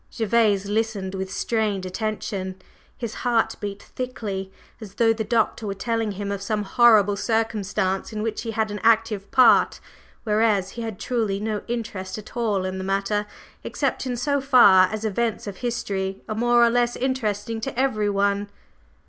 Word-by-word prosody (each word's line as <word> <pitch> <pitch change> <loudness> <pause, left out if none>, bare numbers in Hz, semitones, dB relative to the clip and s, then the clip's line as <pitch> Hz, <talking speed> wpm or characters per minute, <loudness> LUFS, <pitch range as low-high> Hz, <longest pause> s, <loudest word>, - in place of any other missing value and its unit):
Gervase 215 -3 +2
listened 205 -2 -2
with 190 0 -4
strained 210 -5 -1
attention, 190 -1 -3 0.4
his 235 -3 -5
heart 235 -2 +2
beat 205 -1 -6
thickly, 205 -7 -5 0.3
as 205 -4 -10
though 225 0 +4
the 220 0 -3
Doctor 225 0 0
were 200 - -3
telling 225 0 -1
him 200 +1 -4
of 200 -1 -3
some 210 +1 -1
horrible 210 -1 +5
circumstance 210 -3 -1
in 215 -1 -4
which 220 -1 -2
he 230 - -5
had 220 -1 -1
an 205 - -4
active 220 -3 +2
part; 255 - +5 0.4
whereas 210 -3 +1
he 235 - -7
had 225 -4 -5
truly 220 -6 -1
no 215 0 -2
interest 215 -6 -4
at 215 +3 -11
all 210 -6 0
in 190 0 -3
the - - -4
matter, 195 +2 -1 0.4
except - - -2
in 245 -1 -2
so 280 +3 0
far 220 -9 +7
as 215 0 -4
events 220 +1 -1
of 200 -2 -6
history 195 -6 -3
are 215 - -2
more 240 +2 +4
or 235 - +3
less 240 0 +1
interesting 230 -3 -2
to 255 0 -4
everyone. 205 -5 +1
215 Hz, 165 wpm, -24 LUFS, 200-230 Hz, 0.4 s, far